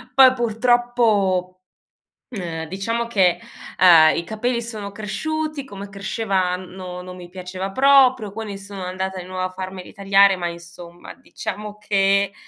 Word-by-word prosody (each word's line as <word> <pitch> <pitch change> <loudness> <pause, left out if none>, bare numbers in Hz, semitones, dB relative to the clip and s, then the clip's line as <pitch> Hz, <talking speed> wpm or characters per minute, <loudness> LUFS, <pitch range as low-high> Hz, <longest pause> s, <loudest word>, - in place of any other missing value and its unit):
poi 260 -1 +8
purtroppo, 225 -6 +1 0.7
ehm, 170 -8 -5
diciamo 230 +6 -2
che, 190 -6 +2 0.4
ehm, 165 -4 +7
i 170 - -2
capelli 235 +2 -2
sono 215 -3 -7
cresciuti 305 +8 -4
come 200 -5 -9
cresceva 195 -2 -1
no, 180 -1 -8
non 180 0 -9
mi 175 -1 -11
piaceva 185 +1 -6
proprio, 260 -5 +4
quindi 210 -2 -6
sono 195 -1 -8
andata 190 +1 -4
di - - -10
nuovo 185 0 -4
a 185 - -1
farmeli 185 +1 -8
tagliare 195 -1 +4
ma 175 -1 -3
insomma, 170 0 -10
diciamo 220 -8 -7
che 200 -1 +1
195 Hz, 140 wpm, -21 LUFS, 185-225 Hz, 0.7 s, poi